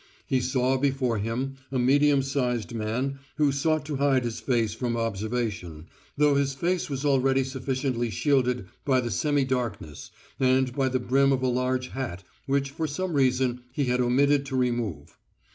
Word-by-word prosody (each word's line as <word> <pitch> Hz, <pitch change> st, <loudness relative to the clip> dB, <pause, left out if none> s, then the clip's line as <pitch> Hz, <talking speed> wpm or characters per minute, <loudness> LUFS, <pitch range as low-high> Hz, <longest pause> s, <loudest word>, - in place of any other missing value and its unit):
He 130 Hz, -1 st, +1 dB
saw 130 Hz, +1 st, +1 dB
before 130 Hz, -4 st, 0 dB
him 125 Hz, +6 st, -3 dB
a 135 Hz, -, -1 dB
medium 140 Hz, +2 st, +4 dB
sized 125 Hz, -5 st, -1 dB
man 120 Hz, +5 st, -2 dB, 0.2 s
who 150 Hz, -2 st, +3 dB
sought 155 Hz, +2 st, 0 dB
to 150 Hz, -2 st, -3 dB
hide 135 Hz, -2 st, +2 dB
his 120 Hz, -2 st, -3 dB
face 115 Hz, -5 st, 0 dB
from 120 Hz, 0 st, -2 dB
observation, 105 Hz, -7 st, -3 dB, 0.3 s
though 150 Hz, 0 st, +4 dB
this 140 Hz, -1 st, +1 dB
face 175 Hz, +5 st, -1 dB
was 140 Hz, 0 st, -3 dB
already 135 Hz, -1 st, +3 dB
sufficiently 130 Hz, -2 st, -2 dB
shielded 125 Hz, 0 st, +1 dB, 0.2 s
by 130 Hz, -2 st, +3 dB
the 120 Hz, -2 st, -2 dB
semi 145 Hz, -, +1 dB
darkness 115 Hz, -, -3 dB, 0.3 s
and 130 Hz, -1 st, +2 dB
by 135 Hz, -2 st, +1 dB
the 130 Hz, 0 st, 0 dB
brim 135 Hz, +3 st, +3 dB
of 130 Hz, -1 st, 0 dB
a -, -, +2 dB
large 125 Hz, +1 st, 0 dB
hat 125 Hz, -9 st, -5 dB, 0.2 s
which 140 Hz, 0 st, 0 dB
for 160 Hz, +2 st, -2 dB
some 175 Hz, +5 st, -3 dB
reason 130 Hz, -2 st, +1 dB
he 145 Hz, -, -1 dB
had 125 Hz, 0 st, +1 dB
omitted 140 Hz, +3 st, +3 dB
to 135 Hz, -, -4 dB
remove. 120 Hz, -, -2 dB
130 Hz, 170 wpm, -26 LUFS, 120-140 Hz, 0.3 s, medium